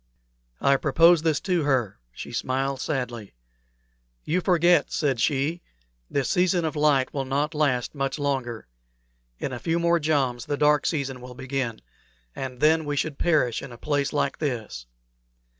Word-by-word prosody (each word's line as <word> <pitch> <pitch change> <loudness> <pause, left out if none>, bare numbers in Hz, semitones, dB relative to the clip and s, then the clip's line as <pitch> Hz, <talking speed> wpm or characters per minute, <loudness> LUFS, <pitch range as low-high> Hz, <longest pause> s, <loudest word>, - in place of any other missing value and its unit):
I 140 0 +3
proposed 165 +4 +4
this 155 -4 +2
to 180 -3 0
her; 130 - 0
she - - -9
smiled 135 +1 -2
sadly. 120 - -4 0.9
"You 180 +4 0
forget," 175 -2 +3
said 140 -6 0
she, 145 +7 0 0.5
"this 140 -3 0
season 180 -1 +2
of 160 - -2
light 145 -3 +2
will 140 - -1
not 140 +4 -1
last 140 -5 0
much 135 0 -2
longer. 130 - -2 0.7
In 130 - -4
a 125 - -5
few 165 +4 0
more 170 0 +2
joms 135 -6 0
the 145 - -1
dark 150 0 +3
season 135 -5 -2
will 125 0 -10
begin, 130 - -3 0.5
and 130 -2 -6
then 160 +1 +4
we 145 0 -2
should 145 0 -2
perish 150 -9 +2
in 140 - -9
a 120 - -10
place 145 +1 -1
like 150 - -1
this." 115 - -4
140 Hz, 160 wpm, -25 LUFS, 130-155 Hz, 0.9 s, proposed